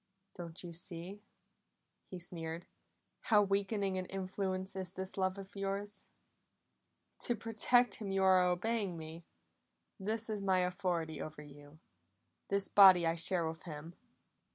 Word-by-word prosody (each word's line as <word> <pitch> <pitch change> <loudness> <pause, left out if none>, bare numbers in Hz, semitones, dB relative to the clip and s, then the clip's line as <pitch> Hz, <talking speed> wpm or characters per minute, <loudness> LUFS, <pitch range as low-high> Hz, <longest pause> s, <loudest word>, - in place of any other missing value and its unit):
"Do 170 -2 -7
you 175 -1 -7
see," 175 +3 -5 0.9
he 185 - -7
sneered, 170 -1 -6 0.6
"how 210 -3 +5
weakening 195 -1 0
an 185 - -5
influence 190 0 -3
is 185 -2 -4
this 190 0 -5
love 190 0 0
of 195 0 -10
yours? 200 +1 -4 1.1
To 240 - +1
protect 230 +1 +2
him 200 -2 -3
you 195 0 +1
are 185 -1 +6
obeying 185 +1 0
me; 160 +1 -8 0.7
this 220 +3 -2
is 215 -2 -3
my 190 -2 +3
authority 180 -4 -1
over 155 -1 -7
you 145 +1 -14 0.7
this 200 0 +1
body 190 -4 +8
I 165 - +2
share 170 0 +3
with 160 0 -6
him!" 160 0 -8
185 Hz, 135 wpm, -34 LUFS, 170-200 Hz, 1.1 s, body